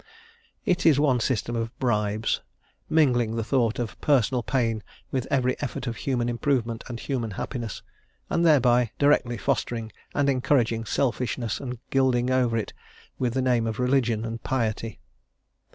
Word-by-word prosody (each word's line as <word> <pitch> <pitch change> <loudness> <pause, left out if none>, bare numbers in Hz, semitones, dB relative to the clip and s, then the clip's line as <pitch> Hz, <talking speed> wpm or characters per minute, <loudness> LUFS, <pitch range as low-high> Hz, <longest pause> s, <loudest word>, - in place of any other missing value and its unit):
It 180 - +1
is 150 -4 +5
one 135 -4 +3
system 120 0 -1
of 115 0 -3
bribes, 105 -3 0 0.5
mingling 120 -8 +3
the 115 - -1
thought 120 -1 +1
of 120 -3 -4
personal 130 -3 +3
pain 115 -4 0 0.3
with 130 -2 -1
every 130 -2 +2
effort 140 -2 -4
of 120 -2 -3
human 125 -3 -1
improvement 120 -2 0
and 120 -1 -6
human 120 -4 -2
happiness, 115 -5 -4 0.4
and 170 - +1
thereby 125 -7 +4
directly 140 -4 +3
fostering 115 -2 -1 0.2
and 145 -1 +2
encouraging 125 -4 +2
selfishness 120 -2 -1
and 125 -2 -5
gilding 130 -2 +2
it - - +2
over 115 -4 +1 0.5
with 125 -2 0
the 130 - +1
name 120 -3 +2
of 110 0 -3
religion 125 -4 +1
and 115 0 -5
piety. 115 -3 -2
120 Hz, 150 wpm, -26 LUFS, 115-135 Hz, 0.5 s, is